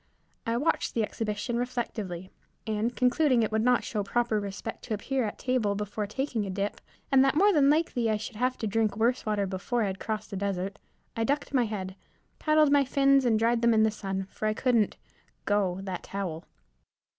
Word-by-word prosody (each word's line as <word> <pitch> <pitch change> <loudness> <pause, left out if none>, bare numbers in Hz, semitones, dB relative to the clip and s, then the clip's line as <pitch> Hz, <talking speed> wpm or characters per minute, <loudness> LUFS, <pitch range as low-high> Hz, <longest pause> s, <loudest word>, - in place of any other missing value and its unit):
I 230 +1 +1
watched 300 +6 0
the 230 - +2
exhibition 215 +2 -3
reflectively, 215 -7 -4 0.3
and, 220 +2 -1
concluding 250 -1 +3
it 220 - -1
would 220 0 +1
not 245 +1 +3
show 210 - -2
proper 230 +1 0
respect 200 +2 -6
to 220 - -1
appear 265 +5 -1
at 210 - -4
table 245 -6 0
before 210 +1 -3
taking 245 0 -2
a 195 - -4
dip, 200 +2 -3 0.3
and 270 -1 +6
that 270 +1 +2
more 400 +5 +5
than 285 -4 +5
likely 290 -7 +2
I 215 - +2
should 215 +1 -7
have 255 +2 0
to - - -3
drink 215 0 0
worse 235 +1 +1
water 210 -2 +1
before 195 +5 -1
I - - +1
had 190 0 -4
crossed 215 0 -4
the 195 - -3
desert, 195 0 -3 0.4
I 225 - 0
ducked 285 +4 -1
my 250 -3 +3
head, 190 -3 -5 0.4
paddled 305 -1 +4
my 285 -1 +5
fins, 275 0 +3
then 225 -3 +3
dried 230 +1 +2
them 235 -1 +4
in 220 - +5
the 220 - +3
sun, 195 -2 -4
for 215 - -3
I 215 - 0
couldn't 235 -4 +2 0.5
"go" 195 -3 +1
that 190 -2 -4
towel. 180 -5 -5
220 Hz, 205 wpm, -28 LUFS, 205-250 Hz, 0.5 s, and